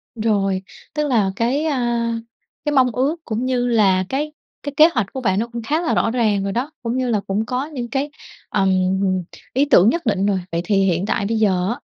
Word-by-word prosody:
Rồi, 200 -4 0 0.3
tức 300 -1 0
là 215 -8 +2
cái, 250 +8 0
a, 240 -5 0 0.5
cái 295 - 0
mong 255 -2 +4
ước 265 +7 0
cũng 230 +2 -2
như 250 -1 0
là 195 -5 +3
cái 295 +3 -2 0.3
cái 285 -1 -4
kế 315 +2 +8
hoạch 235 -6 +1
của 265 - -4
bạn 190 -4 +1
nó 230 - -1
cũng 235 - -4
khá 305 +8 0
là 330 - 0
rõ 225 - +1
ràng 215 -5 +1
rồi 195 - -2
đó, 250 +8 -2
cũng 235 +1 -1
như 255 -1 0
là 220 -3 +2
cũng 205 +3 0
có 250 +4 -2
những 265 -6 -5
cái, 275 +4 -1 0.4
ừm, 195 -2 +2 0.8
ý 270 +3 +3
tưởng 210 -8 +6
nhất 335 +1 -1
định 200 -3 +1
rồi. 200 -2 +1
Vậy 170 +1 -1
thì 210 - +1
hiện 180 0 +1
tại 200 - -1
bây 225 +2 0
giờ 190 -4 +2
á, 240 +4 -3
235 Hz, 225 wpm, -20 LUFS, 200-265 Hz, 0.8 s, kế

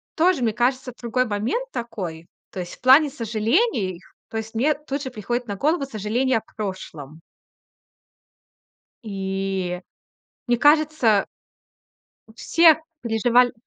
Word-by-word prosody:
тоже, 340 -5 +3
мне 225 - +2
кажется, 250 +2 0
другой 245 +1 0
момент 240 - -2
такой. 180 -9 -6 0.2
То - - -6
есть 175 -1 -6
в - - -30
плане 275 +4 +6
сожалений, 225 - 0 0.3
то - - -10
есть 220 0 -6
мне 275 +7 +3
тут 285 -1 -5
же 260 - -4
приходит 240 +2 -3
на 200 - -3
голову 290 - +1
сожаление 235 +1 0
о - - -18 0.2
прошлом. 165 -7 -6 1.8
И 195 -3 -3 0.7
мне 240 -1 +2
кажется 295 -8 +4 1.1
все 330 -2 +5 0.2
переживаль 240 +2 +3
235 Hz, 120 wpm, -23 LUFS, 200-275 Hz, 1.8 s, плане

